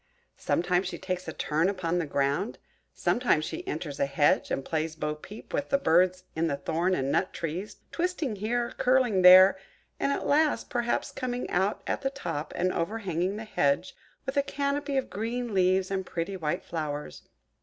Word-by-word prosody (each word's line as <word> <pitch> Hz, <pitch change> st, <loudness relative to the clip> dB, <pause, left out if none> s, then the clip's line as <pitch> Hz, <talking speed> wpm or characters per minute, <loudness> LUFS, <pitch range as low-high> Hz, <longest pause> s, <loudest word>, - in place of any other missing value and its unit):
Sometimes 180 Hz, +2 st, +1 dB
she -, -, -5 dB
takes 185 Hz, -1 st, -4 dB
a -, -, -2 dB
turn 160 Hz, +4 st, 0 dB
upon 180 Hz, -3 st, -1 dB
the 165 Hz, -, -2 dB
ground; 140 Hz, -, 0 dB, 0.3 s
sometimes 235 Hz, -11 st, +1 dB
she 360 Hz, +2 st, -6 dB
enters 150 Hz, -, -4 dB
a 140 Hz, -, +2 dB
hedge, 145 Hz, +1 st, +2 dB
and 135 Hz, -, -2 dB
plays 160 Hz, 0 st, -2 dB
at -, -, -27 dB
bo 150 Hz, 0 st, -1 dB
peep 190 Hz, +8 st, -12 dB
with 285 Hz, -, -1 dB
the 275 Hz, -, +3 dB
birds 185 Hz, -4 st, +3 dB
in 165 Hz, +1 st, +1 dB
the 140 Hz, -3 st, -1 dB
thorn 170 Hz, +6 st, 0 dB
and 135 Hz, -2 st, -1 dB
nut 185 Hz, -, +1 dB
trees–twisting 215 Hz, -, -3 dB
here, 235 Hz, +4 st, -1 dB
curling 250 Hz, -6 st, +3 dB
there, 185 Hz, +1 st, +9 dB, 0.4 s
and 280 Hz, -, +1 dB
at -, -, -2 dB
last, 300 Hz, +1 st, +2 dB
perhaps 240 Hz, -2 st, -1 dB
coming 250 Hz, -1 st, -3 dB
out 195 Hz, +2 st, 0 dB
at -, -, -2 dB
the 270 Hz, -, 0 dB
top, 215 Hz, -, -5 dB
and 185 Hz, +1 st, +1 dB
overhanging 185 Hz, 0 st, -1 dB
the 215 Hz, -, -5 dB
hedge 145 Hz, -4 st, 0 dB, 0.3 s
with 270 Hz, +1 st, -3 dB
a -, -, +6 dB
canopy 280 Hz, 0 st, -2 dB
of 265 Hz, -, -2 dB
green 230 Hz, +2 st, -3 dB
leaves 185 Hz, 0 st, +2 dB
and 190 Hz, -1 st, -1 dB
pretty 170 Hz, +3 st, -3 dB
white 155 Hz, -5 st, -2 dB
flowers. 150 Hz, -3 st, -5 dB
185 Hz, 180 wpm, -28 LUFS, 165-240 Hz, 0.4 s, there